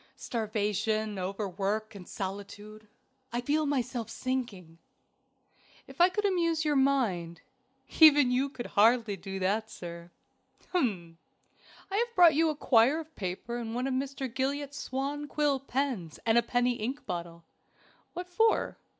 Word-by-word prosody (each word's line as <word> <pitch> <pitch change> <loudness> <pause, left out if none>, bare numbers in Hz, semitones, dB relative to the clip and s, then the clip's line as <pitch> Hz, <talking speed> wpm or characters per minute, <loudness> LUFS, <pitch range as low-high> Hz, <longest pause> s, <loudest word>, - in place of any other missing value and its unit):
"Starvation, 215 -3 -2
overwork, 200 +3 -2
and 190 -3 -11
solitude. 205 +2 -7 0.4
I 240 - -1
feel 295 +5 0
myself 250 -4 -2
sinking." 225 -12 -4 1.1
"If - - -5
I 355 - +7
could 415 +3 -2
amuse 335 -4 +1
your 300 -1 +2
mind." 220 - +1 0.6
"Even 290 -5 +8
you 260 +3 +1
could 245 -3 -7
hardly 225 0 +3
do 195 +1 -7
that, 205 +4 0
sir." 170 -2 -9 0.6
"Hum! 185 - -1 0.7
I 395 - 0
have 470 +1 -1
brought 345 -3 +7
you 320 +2 +3
a 305 - -2
quire 265 +2 +4
of 320 -1 -10
paper 200 +5 -4
and 230 -1 -5
one 250 +1 -1
of 270 - -1
Mr. 270 0 -2
Gillott's 280 +2 -2
swan 280 +3 -3
quill 290 -2 +1
pens 255 - -3
and 225 -1 +3
a 235 - +6
penny 245 +1 0
ink 250 +6 -4
bottle." 170 -2 -6 0.7
"What 355 +1 -5
for?" 445 +5 +1
240 Hz, 140 wpm, -29 LUFS, 205-285 Hz, 1.1 s, Even